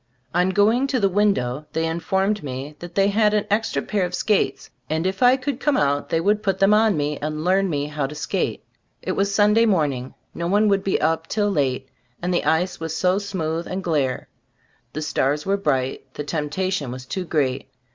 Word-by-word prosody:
On 180 +2 +2
going 215 +7 +3
to 270 -2 0
the 200 - +3
window, 155 -9 0
they 160 0 0
in 165 +1 -2
formed 195 +4 0
me 135 +2 -6
that 175 0 -9
they 195 0 +3
had 210 0 +3
an 210 - +1
extra 220 +2 0
pair 205 -3 -1
of 180 0 -2
skates 210 +1 0 0.2
and 160 +2 -1
if 190 +1 -2
I 250 +1 +6
could 265 0 -3
come 295 +1 +1
out 145 0 +1
they 165 - +1
would 210 +5 +1
put 195 -3 0
them 195 +2 +4
on 215 -4 +4
me 145 0 -1
and 155 +1 -3
"learn" 190 +2 +2
me 145 -3 -1
how 150 -2 -2
to 150 - -9
skate. 150 - -2 0.4
It - - -2
was 200 +1 0
Sunday 210 +3 +4
morning; 145 - 0 0.2
no 170 - -3
one 205 +4 +3
would 195 -1 +2
be 195 - +1
up 160 +1 0
till 205 -1 0
late, 135 -6 0 0.3
and 180 +1 -1
the 175 - 0
ice 170 +3 +1
was 160 -1 -4
so 185 +1 +2
smooth 170 -5 -3
and 185 +1 -4
"glare." 145 -7 -1 0.7
The 155 - -3
stars 150 0 0
were 195 - +2
bright, 135 -8 -1
the 150 - -4
temptation 150 +1 -2
was 125 0 -7
too 185 +8 -3
great. 140 -6 -1
180 Hz, 210 wpm, -22 LUFS, 150-200 Hz, 0.7 s, I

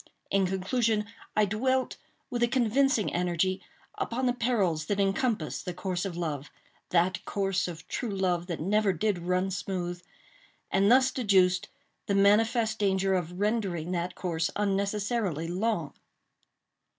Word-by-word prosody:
In 195 -1 +3
conclusion, 210 +3 0 0.3
I 215 - +4
dwelt, 260 +6 0 0.3
with 240 - -2
a 240 - +4
convincing 240 -1 +2
energy, 180 +1 0 0.4
upon 255 -9 -1
the 245 - +2
perils 205 -11 0
that 205 -1 0
encompass 200 - 0
the 180 - -5
course 180 0 -2
of 180 -3 -4
love—that 170 +3 -2
course 195 -2 -1
of 165 -1 -8
true 240 - -3
love 180 -3 0
that 170 -3 -4
never 200 +3 +2
did 205 +1 0
run 180 +2 0
smooth—and 190 - -3
thus 260 +1 +5
deduced 190 -7 +2 0.4
the 200 - +1
manifest 220 +3 +3
danger 195 -1 +2
of 180 0 -2
rendering 200 -6 -1
that 175 0 -2
course 165 -3 -1
unnecessarily 200 -3 -1
long. 180 -3 -1
195 Hz, 130 wpm, -28 LUFS, 180-220 Hz, 0.4 s, thus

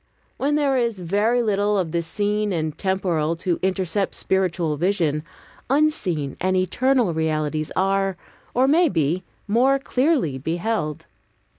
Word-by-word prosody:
When 290 +2 +1
there 280 -3 +2
is 235 -4 0
very 205 +7 +1
little 205 -1 +1
of 175 -4 -1
the 170 0 0
seen 205 +4 -1
and 160 -3 -2
temporal 170 -4 0
to 175 0 -2
intercept 190 +1 -1
spiritual 175 -4 0
vision, 165 -3 0 0.5
unseen 210 - +1
and 185 +1 +1
eternal 245 +2 +2
realities 155 -1 -1
are, 195 0 +1 0.4
or 255 +2 +4
may 325 +4 +4
be, 165 - 0 0.3
more 250 +6 +3
clearly 260 - 0
beheld. 165 - -2
190 Hz, 130 wpm, -23 LUFS, 165-230 Hz, 0.5 s, or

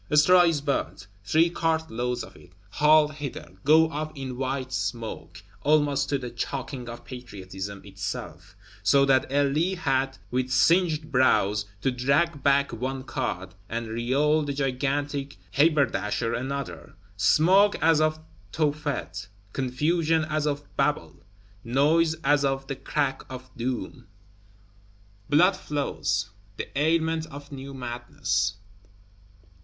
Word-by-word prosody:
Straw 165 +5 +6
is 165 -4 +1
burnt; 140 -8 -2 0.2
three 160 +11 +3
cartloads 125 -8 -1
of - - -12
it, - - -17 0.2
hauled 150 +3 +4
hither, 140 - -7
go 160 +2 +6
up 155 +1 -3
in 130 -2 -5
white 130 0 -3
smoke, 110 -9 -4 0.2
almost 145 -2 +2
to 140 - +1
the 125 -3 -6
choking 130 +1 -4
of 120 - -9
Patriotism 100 -5 -8
itself; 100 0 -6 0.3
so 140 +8 +4
that 130 -1 +2
Elie 145 +6 +2
had, 135 -6 0
with 125 +1 0
singed 155 +3 +3
brows, 105 -5 +3 0.2
to 135 - +1
drag 140 +5 +1
back 140 -1 +3
one 130 +3 -3
cart, 110 -10 -4 0.2
and 115 0 -3
Réole 140 +7 +1
the 145 -1 -3
"gigantic 140 +1 -2
haberdasher" 140 -7 +2
another. 130 -11 -5 0.2
Smoke 185 - +4
as 160 -1 +4
of 155 0 +1 0.3
Tophet; 145 - -2 0.3
confusion 155 +5 +1
as 155 -1 -1
of 145 0 -2
Babel; 135 - 0 0.5
noise 155 +7 +3
as 145 +1 +3
of 135 -1 0
the 135 - -4
Crack 135 -1 -1
of 130 0 -9
Doom! 125 +1 -4 1.2
Blood 180 +6 +5
flows; 105 - -2 0.3
the - - -5
ailment 160 +2 +1
of 145 0 -11
new 135 0 -8
madness. 120 -5 -2
140 Hz, 125 wpm, -26 LUFS, 125-150 Hz, 1.2 s, Straw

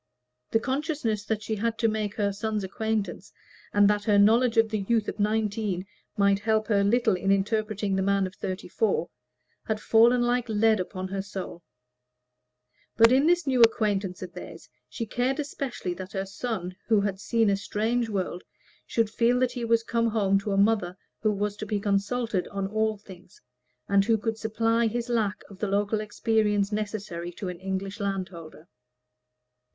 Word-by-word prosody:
The 225 - +2
consciousness 265 - -2
that 215 -1 -2
she 220 - -3
had 225 +2 -1
to 230 - +2
make 215 -2 -2
her 200 -2 0
son's 210 0 -2
acquaintance, 205 -1 -3 0.4
and 205 0 +5
that 205 0 +1
her 210 -2 +4
knowledge 230 +4 +4
of 225 0 +5
the 215 - 0
youth 215 +2 0
of - - -5
nineteen 210 -3 0 0.3
might 200 -1 +3
help 220 0 +1
her 200 -2 +3
little 225 +1 +3
in 195 +2 0
interpreting 210 0 0
the 190 - +1
man 200 0 +2
of 185 - -6
thirty 185 0 -5
four, 450 - 0 0.6
had 220 -1 -1
fallen 235 +3 +4
like 245 0 0
lead 215 -1 +3
on 185 0 -3
her 195 0 -2
soul; 190 -3 -7 1.4
but 230 +1 +7
in 270 +4 +4
this 350 -1 +3
new 260 -3 +2
acquaintance 205 -5 +2
of 180 - -8
theirs - - -10 0.2
she 230 - -4
cared 250 +5 -1
especially 275 -9 -4
that 185 +1 -9
her 195 -1 -2
son, 195 -3 -4
who 220 -3 +4
had 200 -1 -2
seen 225 +1 +1
a 200 - +3
strange 225 +4 -1
world, 185 -3 -3 0.4
should 230 -2 +1
feel 235 +3 +2
that 255 -1 +2
he 245 - -5
was 230 0 +2
come 230 0 0
home 200 -3 +2
to 200 - -5
a 195 - +1
mother 200 -3 +2 0.2
who 215 - +2
was 205 0 -2
to 215 - -5
be 205 0 -1
consulted 205 +1 0
on 195 -1 -3
all 220 +1 0
things, 190 -1 -15 0.5
and 200 0 +4
who 225 0 +3
could 220 +1 -3
supply 225 +1 +1
his 235 +2 -3
lack 220 -4 0
of 195 -2 -14
the 210 - -1
local 205 +2 0
experience 210 -1 +1
necessary 205 -5 -4
to 185 +2 -6
an 180 -1 -7
English 195 +2 -4
landholder. 180 -5 -5
210 Hz, 180 wpm, -27 LUFS, 195-225 Hz, 1.4 s, but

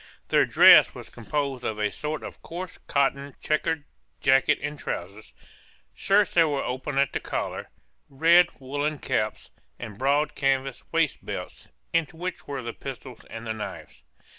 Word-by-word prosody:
Their - - +4
dress - - +8
was - - -10
composed 135 +2 -3
of 110 - -2
a 105 -1 0
sort 150 +1 -4
of - - -9
coarse 175 +2 -7
cotton 140 0 0
chequered 155 0 0 0.4
jacket 135 -1 +4
and 145 +1 -4
trowsers, 100 +5 -6 0.6
shirts 200 0 +2
that 165 -2 +4
were 140 -2 -1
open 130 +2 -4
at 140 0 +2
the - - -1
collar, - - -4 0.4
red 170 +5 +5
woollen 145 +3 -2
caps, - - -2 0.3
and 110 -4 -8
broad 145 +3 +2
canvas 135 -1 0
waistbelts, 165 -3 -2 0.3
in 165 -1 +3
which 180 +2 -6
were 140 -3 -4
the 115 0 -5
pistols 130 -3 -9
and 115 +1 -9
the 110 - -2
knives. 110 -1 -8
140 Hz, 150 wpm, -26 LUFS, 130-155 Hz, 0.6 s, dress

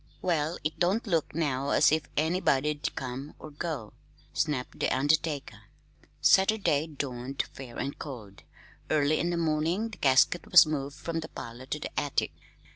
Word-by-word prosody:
"Well, 165 -2 0
it 155 +1 -3
don't 190 +7 +2
look 165 -7 0
now 140 -4 0
as - - +5
if 155 -1 0
anybody'd 150 -3 +1
come 130 +3 -5
or 155 - -10
go," 145 -7 -5 0.4
snapped 145 -5 -2
the - - +1
undertaker. 145 +2 0 0.5
Saturday 190 -7 +3
dawned 135 -3 -3
fair 125 -3 -9
and 140 - -4
cold. 110 -9 -8 0.5
Early 150 0 +2
in 170 - 0
the 175 - -1
morning 165 +6 0
the 220 - -10
casket 135 +6 +3
was 180 - +9
moved 145 -2 -3
from 165 0 -3
the 155 - -7
parlor 120 +3 -9
to 150 - -3
the - - -3
attic. 145 -2 -1
150 Hz, 155 wpm, -29 LUFS, 135-165 Hz, 0.5 s, was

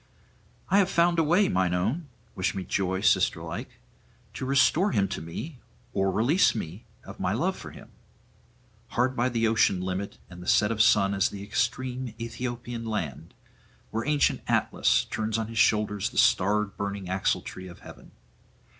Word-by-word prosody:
'I 195 - +5
have 195 -2 +3
found 170 -1 +3
a - - +4
way, 175 +6 +3
mine 90 -1 +1
own 120 - -1 0.3
wish 95 +1 -1
me 95 - -3
joy, 95 +1 -1
sisterlike - - 0 0.6
to 130 - -5
restore 140 +8 +3
him 100 -4 +2
to - - -4
me 120 - -7 0.3
or 95 0 +1
release 120 - +3
me 95 0 -6 0.2
of - - -11
my - - 0
love - - 0
for - - -9
him. - - -14 1.1
Hard 130 +2 +2
by 120 +1 +1
the 115 -2 +1
ocean 110 -4 +3
limit 95 +2 -4
and 90 -1 -11
the 90 - -10
set 105 +1 +4
of 110 -1 +1
sun 105 -3 +4
is 95 -1 +2
the 100 -1 -8
extreme 125 +2 -2
Aethiopian 120 0 -5
land, 85 - -4 0.6
where 115 +1 -2
ancient 150 -1 +2
Atlas - - +2
turns 110 0 -2
on 110 -1 -3
his 115 -1 -3
shoulders 105 -2 +2
the - - -11
starred 105 +2 +3
burning 100 -1 -4
axletree 95 0 -2
of 85 - -13
heaven. - - -13
110 Hz, 165 wpm, -27 LUFS, 95-125 Hz, 1.1 s, I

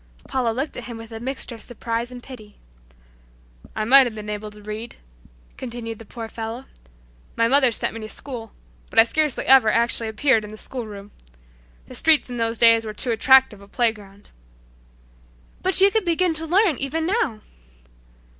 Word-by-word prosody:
Paula 255 -3 0
looked 265 +7 -3
at 245 - -6
him 235 -2 -7
with 225 0 -11
a 225 - -7
mixture 260 +1 -3
of 225 - -11
surprise 235 0 -4
and 245 -1 -10
pity. 215 -6 -12 1.2
"I 215 - -2
might 265 +2 +7
have 225 - -7
been 210 -1 -6
able 210 0 -5
to 210 0 -15
read," 215 +3 -7 0.6
continued 235 -3 -6
the 225 - -11
poor 230 +1 -8
fellow. 225 +3 -7 0.7
"My 230 - +2
mother 265 +1 +4
sent 225 - -1
me 225 - -7
to 215 -1 -8
school, 235 -5 -6 0.4
but - - -12
I 225 - +10
scarcely 300 +3 0
ever 260 -5 +6
actually 230 0 +1
appeared 220 +1 +1
in 210 - -8
the 215 - -10
school 245 0 -4
room. 205 -1 -10 0.8
The - - -11
streets 310 -5 +3
in 245 - -5
those 230 0 -1
days 230 0 +5
were 215 -1 -7
too 245 +3 +1
attractive 260 -2 +4
a 200 - -15
playground." 205 -3 -3 1.3
"But 375 0 +2
you 395 +1 +6
could 440 -2 0
begin 345 0 +1
to 320 +1 -2
learn 365 - +2
even 310 +4 -2
now!" 335 - -1
235 Hz, 185 wpm, -22 LUFS, 220-270 Hz, 1.3 s, I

